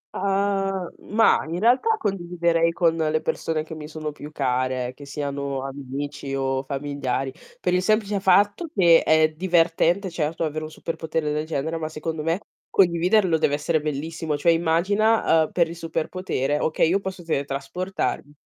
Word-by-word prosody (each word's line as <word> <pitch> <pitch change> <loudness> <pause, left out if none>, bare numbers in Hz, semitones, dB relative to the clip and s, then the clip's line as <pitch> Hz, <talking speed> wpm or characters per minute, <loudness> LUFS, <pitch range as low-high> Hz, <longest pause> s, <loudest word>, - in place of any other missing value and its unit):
Ah, 195 -1 0 0.2
mah, 225 +2 +4
in 165 +2 -3
realtà 255 - +3
condividerei 170 - 0
con 165 -1 +2
le 155 -1 +1
persone 155 -1 -1
che 160 - -9
mi 155 -1 -7
sono 155 -1 -5
più 150 0 -10
care, 130 -2 -1
che 145 +1 -12
siano 140 -1 -3
amici 140 +1 -5
o 135 -1 0
familiari, 135 -1 -3 0.3
per - - 0
il 180 - +3
semplice 210 0 +1
fatto 205 - +3
che 170 -4 +6
è 155 0 +4
divertente, 175 +2 +2
certo, 160 0 -2
avere 155 0 -2
un - - -7
super 165 +1 -6
potere 160 -2 -2
del 150 +1 -2
genere, 160 +1 -2
ma 155 - -3
secondo 160 0 -4
me 165 +5 -1 0.3
condividerlo 180 0 +3
deve 145 -2 +2
essere 155 +1 0
bellissimo. 155 +1 -3
Cioè 170 +4 +3
immagina, 170 +2 +3
uhm, - - -11
per 170 -2 +2
il 170 - -7
super 165 -1 -3
potere: 150 -6 -1
okay 160 +1 +2
io 190 +3 +2
posso 190 -2 -6
teletrasportarmi, 145 +2 -3
160 Hz, 165 wpm, -24 LUFS, 145-180 Hz, 0.3 s, che